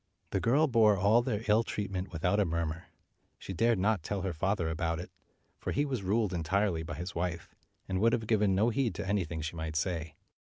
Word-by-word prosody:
The 95 - +1
girl 135 +10 +3
bore 110 -7 +4
all 105 +5 +4
their 110 -2 -2
ill 105 +1 +5
treatment 100 -4 -4
without 90 +4 +1
a - - +5
murmur. 85 -1 -2 0.5
She 95 - -7
dared 115 +4 +2
not 100 0 +1
tell 100 +3 -3
her 95 -2 -2
father 95 +1 0
about 80 0 -1
it, 90 - -8 0.5
for - - -3
he 145 - +1
was 130 -6 -2
ruled 100 0 +1
entirely 90 +1 0
by 80 +1 -6
his 90 +3 -5
wife, 85 -1 -3 0.3
and 95 -1 -1
would 115 +1 +4
have 115 - 0
given 105 -3 +2
no 110 +5 +3
heed 120 -1 0
to - - -4
anything 85 -5 -1
she 80 +2 -4
might 80 -1 -4
say. 80 -1 -2
95 Hz, 210 wpm, -31 LUFS, 85-110 Hz, 0.5 s, ill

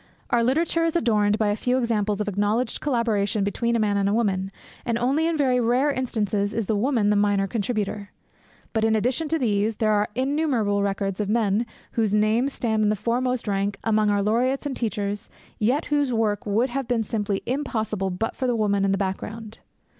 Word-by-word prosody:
Our 235 -1 +3
literature 330 +6 +1
is 330 0 0
adorned 210 -8 +2
by 215 -2 +1
a 205 - +1
few 250 +3 0
examples 215 -4 0
of 210 - -2
acknowledged 205 +4 0
collaboration 220 -7 0
between 235 +4 0
a - - +2
man 205 -2 +1
and 200 0 +1
a 205 - +1
woman, 195 -4 0 0.3
and 235 -1 -1
only 275 +7 +1
in 330 -1 0
very 260 -4 +2
rare 250 +5 +2
instances 210 -6 -1
is 225 -2 -1
the 215 - 0
woman 220 -2 +2
the - - +3
minor 205 -1 +2
contributor. 210 -1 -3 0.6
But, 220 -1 0
in 220 0 +3
addition 255 +8 0
to 325 +2 +1
these, 215 -4 0
there 215 0 +1
are 210 0 +1
innumerable 255 -7 +1
records 195 -1 -2
of 205 -1 -1
men 220 0 +1 0.2
whose 215 -3 +1
names 220 +6 +2
stand 220 -4 -1
in 210 - +3
the 215 - +2
foremost 240 +3 -1
rank 200 0 -1
among 215 -1 +2
our 205 -1 +2
laureates 250 +7 +1
and 280 -2 -2
teachers 205 -3 -3 0.3
yet 255 +9 +1
whose 290 -3 +2
work 220 -3 0
would 230 +5 +1
have 270 -1 -3
been 230 -2 +1
simply 205 -2 -2
impossible 220 -7 -2
but 185 +5 -3
for 260 - -2
the 245 - +1
woman 200 -3 +1
in 195 - +2
the - - +1
background. 210 +3 -5
220 Hz, 200 wpm, -24 LUFS, 205-245 Hz, 0.6 s, Our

